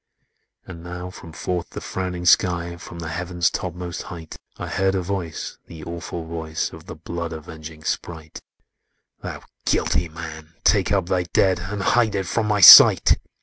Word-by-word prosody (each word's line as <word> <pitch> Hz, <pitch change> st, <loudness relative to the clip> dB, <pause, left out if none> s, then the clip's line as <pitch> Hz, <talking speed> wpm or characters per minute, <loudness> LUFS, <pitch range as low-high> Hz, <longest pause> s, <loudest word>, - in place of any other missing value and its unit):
"And 85 Hz, -2 st, -10 dB
now, 90 Hz, +1 st, -7 dB
from 85 Hz, -, -12 dB
forth 90 Hz, +2 st, -4 dB
the -, -, -7 dB
frowning 90 Hz, -1 st, -5 dB
sky, 85 Hz, -1 st, +2 dB
From 85 Hz, 0 st, -11 dB
the 80 Hz, -1 st, -6 dB
Heaven's 85 Hz, +1 st, -1 dB
topmost 90 Hz, -1 st, -5 dB
height, 80 Hz, -2 st, -9 dB, 0.2 s
I -, -, -5 dB
heard 95 Hz, 0 st, 0 dB
a 95 Hz, -, -1 dB
voice—the 85 Hz, -3 st, -6 dB
awful 85 Hz, 0 st, -6 dB
voice 80 Hz, -1 st, -4 dB
Of -, -, -13 dB
the -, -, -8 dB
blood 85 Hz, -1 st, -6 dB
avenging 80 Hz, 0 st, -10 dB
sprite— 80 Hz, -1 st, -5 dB, 0.8 s
'Thou -, -, -7 dB, 0.2 s
guilty 85 Hz, -, 0 dB
man! 80 Hz, 0 st, -10 dB
take -, -, +2 dB
up -, -, +1 dB
thy 90 Hz, -1 st, 0 dB
dead 95 Hz, -2 st, +3 dB
And 95 Hz, +2 st, -5 dB
hide 115 Hz, -2 st, +2 dB
it 95 Hz, -1 st, -1 dB
from 110 Hz, +4 st, -1 dB
my 105 Hz, -1 st, +1 dB
sight!' -, -, +10 dB
85 Hz, 160 wpm, -22 LUFS, 80-90 Hz, 0.8 s, sight